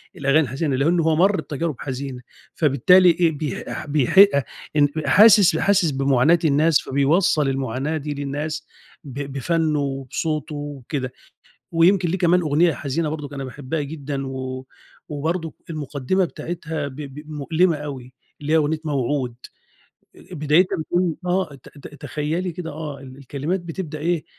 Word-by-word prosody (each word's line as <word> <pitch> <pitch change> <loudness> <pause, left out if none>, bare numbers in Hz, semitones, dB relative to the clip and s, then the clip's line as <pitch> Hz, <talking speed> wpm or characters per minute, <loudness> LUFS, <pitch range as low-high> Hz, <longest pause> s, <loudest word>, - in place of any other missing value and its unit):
الأغاني 140 +2 +3
الحزينة، 140 +1 -1
لإن 165 +6 +2
هو 160 -1 +2
مَر 190 +5 +3
بتجارب 155 0 -3
حزينة، 130 -2 -5 0.3
فبالتالي 170 +5 +5
إيه، 170 -1 +3
بيح 150 -2 -4
ح - - -5
بيحق 150 +6 +6 0.5
ان 145 -1 +5 0.2
حاسس 210 -3 +6
حاسس 190 -6 +2
بمعاناة 135 +4 +3
الناس 155 +2 +4
فبيوصّل 145 +1 +2
المعاناة 135 +3 -2
دي 150 0 -4
للناس، 145 +2 -4 0.4
ب 135 -4 -10 0.2
بفنُّه 155 +2 0
وبصوته 140 +2 -3
وكده. 140 -2 -5 0.6
ويمكن 175 +1 +3
ليه 185 - 0
كمان 180 0 +3
أغنية 160 +2 +2
حزينة 150 +2 -2
برضه 150 -2 -6
أنا 135 - -4
باحبها 140 +3 -4
جدًا 140 -2 -5
و 130 0 -5 0.4
وبرضه 160 +3 -3 0.2
المقدّمة 150 +4 -1
بتاعتها 160 -3 -5
ب 130 - -10
ب 150 +1 -9
مؤلمة 160 +4 +1
أوي، 135 -4 -7 0.3
اللي 150 +2 -1
هي - - +6
أغنية 155 0 +1
موعود، 135 -3 -1 0.8
أ - - -16
أ - - -5
بدايتها 155 +4 +2
بتكون 175 +1 0
آه 180 -4 0
ت 135 - -15 0.2
ت - - -16
تخيّلي 165 +4 -2
كده 165 -1 -6
آه 150 -2 -6
ال 130 -1 -11
الكلمات 145 +7 -3
بتبدأ 165 -2 -6
إيه، 170 +1 -1
150 Hz, 150 wpm, -22 LUFS, 140-165 Hz, 0.8 s, بيحق